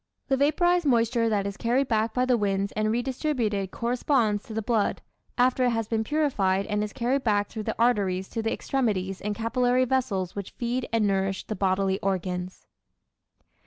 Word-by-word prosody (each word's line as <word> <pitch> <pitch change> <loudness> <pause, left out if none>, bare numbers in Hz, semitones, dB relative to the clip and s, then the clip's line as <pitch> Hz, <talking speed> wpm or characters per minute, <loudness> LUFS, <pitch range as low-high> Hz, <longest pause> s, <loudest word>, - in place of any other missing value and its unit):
The 270 - +4
vaporized 345 +4 +2
moisture 230 -2 +2
that 205 -2 0
is 200 0 -4
carried 250 +4 +1
back 220 -1 +1
by 250 0 +1
the 255 -1 +3
winds 200 -2 0
and 215 0 0
redistributed 240 - -1
corresponds 235 -2 0
to 220 - -8
the 220 - -2
blood, 220 -2 0 0.3
after 255 0 +3
it - - +3
has 225 -2 -1
been 220 -1 0
purified 215 -10 +1
and 210 -1 -1
is 210 - -4
carried 255 +4 0
back 205 -2 +1
through 220 - -5
the - - -2
arteries 195 -6 +1
to 225 - -3
the 225 0 -1
extremities 195 -8 -1
and 210 0 -2
capillary 245 +3 +1
vessels 210 -8 -1
which 200 -2 -6
feed 245 +1 -2
and 225 -2 +2
nourish 195 -1 0
the 215 - -4
bodily 190 0 +1
organs. 185 -1 -3
225 Hz, 180 wpm, -26 LUFS, 200-250 Hz, 0.3 s, The